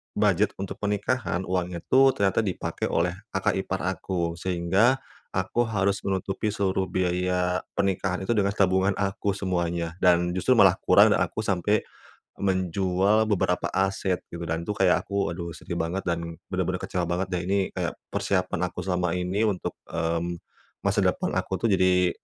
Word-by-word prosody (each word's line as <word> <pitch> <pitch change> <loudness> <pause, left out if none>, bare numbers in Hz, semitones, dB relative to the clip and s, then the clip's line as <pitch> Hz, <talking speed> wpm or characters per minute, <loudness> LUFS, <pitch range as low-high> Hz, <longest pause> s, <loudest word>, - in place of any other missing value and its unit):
budget 105 -1 +2
untuk 95 -1 -5
pernikahan, 105 -1 -1
uangnya 90 -2 -2
tuh 135 0 +6
ternyata 100 0 +2
dipakai 100 -5 -2
oleh 85 +1 +1 0.2
kakak 95 - +2
ipar 95 0 -3
aku. 85 -2 -2
Sehingga 95 +8 +2 0.4
aku 95 +6 0
harus 100 -2 +1
menutupi 95 +2 -1
seluruh 95 -1 0
biaya 90 0 0 0.2
pernikahan 95 -1 0
itu 95 - -1
dengan 100 -2 +1
tabungan 95 0 +2
aku 100 0 -1
semuanya 85 -3 -1
dan 90 -1 +4
justru 90 0 +2
malah - - +6
kurang - - +6
dan - - +3
aku 110 - -4
sampai 105 +2 +1 0.6
menjual 95 +2 +2
beberapa 90 -3 +1
aset 95 -1 0
gitu 85 0 -7
dan 80 +1 -2
tuh 105 - -2
kayak 95 -3 +2
aku, 100 -1 -1
aduh 85 -1 -5
sedih 85 - -6
banget, 85 +4 -2
dan 85 -1 -2 0.2
benar-benar - - -1
kecewa 90 -2 -2
banget 90 +2 -1
deh. 90 -1 -1
Ini 100 +2 +2 0.2
kayak - - -2 0.2
persiapan 95 -3 -1
aku 90 - -6
selama 90 -2 0
ini 90 +4 0
untuk, 100 -4 -2
mmm, 85 +1 -1 0.5
masa - - +1
depan - - 0
aku - - -2
tuh 115 - +3
jadi 90 -1 +3
95 Hz, 160 wpm, -26 LUFS, 90-100 Hz, 0.6 s, tuh